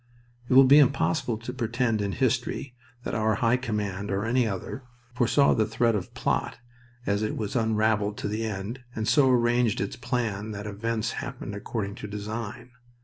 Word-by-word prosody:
It 130 - +3
will 135 - +10
be 140 +3 +7
impossible 115 - +2
to 120 +3 -7
pretend 120 -3 0
in 100 -1 -1
history 125 0 -1 0.3
that - - -4
our 110 -1 +1
High 115 +3 +3
Command, 105 -5 -3
or 100 +2 -1
any 120 +1 +2
other, 100 +6 -4 0.3
foresaw 125 +3 +4
the 110 -1 +1
thread 115 +1 +2
of 100 -4 -4
plot - - -1 0.5
as 100 +1 +1
it 110 - -2
was 105 +1 -3
unraveled 110 -2 +1
to - - -3
the 105 +2 -2
end, 110 +3 -4 0.2
and 110 0 -2
so 140 -3 +5
arranged 120 -2 +3
its 100 - -2
plan 110 -5 -2
that 105 0 -6
events 110 +2 -2
happened 100 - -6
according 100 0 -4
to - - -6
design. 110 +3 -6
110 Hz, 175 wpm, -27 LUFS, 105-120 Hz, 0.5 s, will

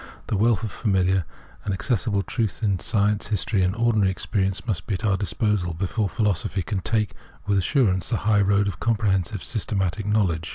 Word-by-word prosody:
The - - -2
wealth 110 +2 +2
of 110 - -3
familiar 95 -4 +1 0.4
and 100 -2 -1
accessible 100 -2 0
truth 115 -1 -2
in 100 -4 +1
science, 105 -1 0
history, 105 -1 0
and 90 +2 +1
ordinary 110 -4 +2
experi 95 +1 -1
ence, 95 - -2
must 105 -7 -3
be 100 - 0
at 110 - -4
our 100 -3 +3
disposal 100 -3 -1
before 100 +4 -1
philosophy 95 -4 -1
can 95 +4 -2
take 105 +1 0 0.3
with 100 -1 +2
assurance 95 -4 +1
the 115 - +1
high 105 -1 +2
road 100 +1 +3
of 100 - -4
comprehensive, 100 -4 0
system 110 -2 -2
atic 95 +2 -1
knowledge. 95 -7 +1
100 Hz, 190 wpm, -24 LUFS, 95-110 Hz, 0.4 s, our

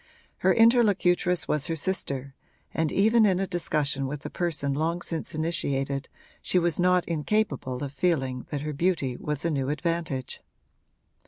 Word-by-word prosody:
Her - - +3
interlocutress 200 -7 +3
was 150 -2 0
her 165 - -1
sister, 140 -6 -2 0.4
and 160 -2 0
even 220 +3 +4
in 190 -3 +3
a 195 - 0
discussion 150 -6 0
with 145 +2 -6
a - - -5
person 155 -6 -1
long 165 +4 -1
since 165 -1 -1
initiated 140 -4 -1 0.3
she - - 0
was 175 -2 +1
not 180 0 +3
incapable 165 -6 -1
of 140 -1 -5
feeling 135 -5 -1
that 145 -2 -3
her 150 0 -4
beauty 145 -5 0
was 150 +3 -4
a 165 - +1
new 135 -2 -1
advantage. 150 -4 -2
160 Hz, 155 wpm, -26 LUFS, 140-180 Hz, 0.4 s, even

